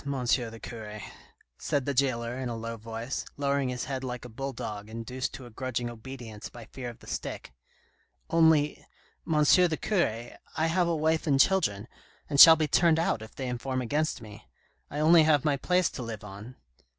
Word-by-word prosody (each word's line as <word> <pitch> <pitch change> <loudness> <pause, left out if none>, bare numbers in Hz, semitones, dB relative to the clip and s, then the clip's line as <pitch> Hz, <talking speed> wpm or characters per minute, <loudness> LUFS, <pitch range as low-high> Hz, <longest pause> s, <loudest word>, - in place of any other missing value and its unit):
the 125 -4 -1
cure," 110 -3 -8 0.6
said 140 -3 -1
the 140 - -1
jailer 120 -3 0
in 130 -1 -4
a 120 - -3
low 115 0 -5
voice, 115 +3 -5
lowering 140 -2 0
his 125 -1 -3
head 130 -1 -4
like 125 -2 -5
a - - -8
bull 135 +4 -5
dog, 105 -4 -6
induced 115 +3 -4
to 130 - -9
a 120 - -12
grudging 120 0 -3
obedience 115 -2 -9
by 120 -2 -11
fear 125 +1 -7
of 120 - -11
the - - -14
stick, - - -5 0.3
' - - -38
' - - -44
only, 160 -3 +4 0.5
M. 150 -1 +4
the 170 +1 +4
cure, 120 - -1 0.3
I 160 - +2
have 170 +2 +2
a 170 - +1
wife 160 +1 0
and 140 -2 +3
children, 115 - +2 0.4
and 140 -2 -1
shall 165 +2 +12
be 155 -1 0
turned 165 +2 +4
out 165 -9 0
if 110 - -11
they 130 - -4
inform 130 +1 -3
against 145 +2 -1
me. 105 - -12 0.4
I 145 - -5
only 160 +2 +6
have 155 -2 +3
my 145 -2 +3
place 180 +6 +1
to - - -7
live 115 -3 -6
on." 105 +5 -10
130 Hz, 200 wpm, -28 LUFS, 115-150 Hz, 0.6 s, shall